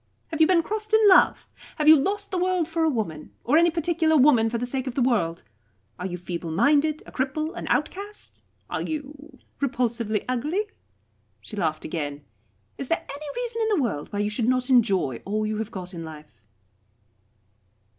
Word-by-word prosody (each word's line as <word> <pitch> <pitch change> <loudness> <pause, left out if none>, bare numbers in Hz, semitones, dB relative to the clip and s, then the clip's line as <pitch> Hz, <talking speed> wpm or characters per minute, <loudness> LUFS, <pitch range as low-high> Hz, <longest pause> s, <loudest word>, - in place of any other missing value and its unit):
Have 320 -1 -2
you 315 - +7
been 345 -2 +4
crossed 430 +3 -1
in 440 -1 +5
love? 375 - +5 0.3
Have 305 -2 -1
you 315 - +10
lost 400 +8 -1
the 370 - -1
world 365 -2 +1
for 330 0 -1
a 320 - +3
woman, 205 - -4
or 255 - +2
any 340 +2 +6
particular 330 -1 +1
woman 255 -5 +5
for 235 - -2
the 245 - -2
sake 260 +1 -3
of 250 - -4
the 270 - +1
world? 185 -10 0 0.6
Are 180 - -3
you 180 -1 -5
feebleminded, 185 - +1
a - - -12
cripple, 305 +5 -2
an - - -6
outcast? 400 +7 -3 0.3
Are - - -3
you 295 -1 -6 0.2
repulsively 235 -5 -1
ugly?" 295 - -1 0.8
She 215 - -10
laughed 160 -6 -2
again. 145 -3 -4 0.5
"Is 275 - -4
there 330 - -1
any 285 +2 -7
reason 480 -2 -3
in 440 - +1
the - - +2
world 150 -11 -3
why 205 - -4
you 205 0 0
should 220 +2 -1
not 255 +1 +1
enjoy 195 - +2
all 215 +2 -1
you 215 0 -2
have 220 0 -3
got 185 -3 -7
in 165 -1 -6
life?" 150 -8 -12
260 Hz, 185 wpm, -25 LUFS, 205-320 Hz, 0.8 s, you